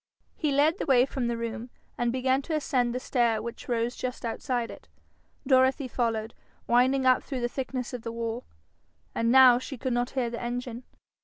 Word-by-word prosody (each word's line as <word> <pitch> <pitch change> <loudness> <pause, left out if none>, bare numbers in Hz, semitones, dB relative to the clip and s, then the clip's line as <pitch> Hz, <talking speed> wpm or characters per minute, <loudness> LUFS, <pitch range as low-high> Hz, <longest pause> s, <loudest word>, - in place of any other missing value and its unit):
He 305 -3 -1
led 300 +6 +3
the - - -3
way 255 -2 +5
from 265 -2 -3
the 235 -1 -1
room, 230 +1 -5 0.3
and 240 -1 0
began 260 +2 +1
to 315 +3 -3
ascend 255 -5 +1
the - - -1
stair 235 -4 +1
which 235 +3 -7
rose 235 0 0
just 250 -1 -5
outside 240 +1 -2
it. - - -13 0.6
Dorothy 260 +1 +3
followed, 230 -2 -2 0.3
winding 260 +2 +3
up 255 0 +5
through 265 -3 -5
the 240 - +1
thickness 255 0 -4
of 250 - -5
the 230 - -5
wall. 230 +1 -4 0.7
And 230 0 +1
now 255 -2 +8
she 270 +1 -7
could 255 +1 -2
not 245 +1 0
hear 240 -3 0
the 235 - -5
engine. 245 0 -4
245 Hz, 190 wpm, -27 LUFS, 235-260 Hz, 0.7 s, now